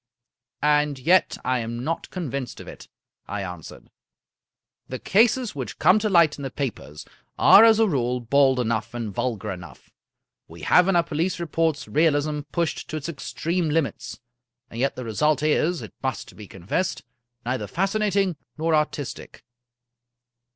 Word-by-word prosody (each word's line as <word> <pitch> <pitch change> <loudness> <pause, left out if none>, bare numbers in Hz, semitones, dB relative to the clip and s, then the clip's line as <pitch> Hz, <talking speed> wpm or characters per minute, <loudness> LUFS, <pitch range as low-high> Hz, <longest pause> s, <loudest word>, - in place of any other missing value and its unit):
" - - -65 0.2
And 150 -1 +2
yet 175 +9 +3
I 130 -1 +1
am 120 +1 -5
not 165 +4 -3
convinced 140 -8 -5
of - - -10
it," - - -11 0.4
I - - -4
answered. 90 -3 -9 0.5
" - - -62
The 130 - -4
cases 230 - +2
which 130 -3 -6
come 180 +7 +5
to 215 0 -1
light 170 -6 +4
in - - -6
the 135 - -4
papers 120 - -6 0.3
are, 215 - +8
as 225 -1 +6
a 225 0 +4
rule, 125 -7 0
bald 130 +2 +3
enough, 115 -1 -2
and 115 -4 -4
vulgar 110 -2 -2
enough. 90 -7 -11 0.6
We 80 0 -13
have 180 - +5
in 195 - +2
our 170 - +4
police 170 +5 -2
reports 165 -2 -1
realism 150 -1 +1
pushed 170 -2 -2
to 155 - -3
its 155 +2 -5
extreme 165 +2 -2
limits, 155 -1 -2 0.5
and 115 - -7
yet 135 +2 0
the 125 - -6
result 150 +7 +1
is, 155 +3 +1
it - - -10
must 130 -1 -4
be 105 -2 -11
confessed, 95 - -3 0.4
neither 125 -4 -2
fascinating 195 - 0 0.2
nor 160 +1 0
artistic." 150 -3 -2
150 Hz, 160 wpm, -24 LUFS, 125-170 Hz, 0.6 s, are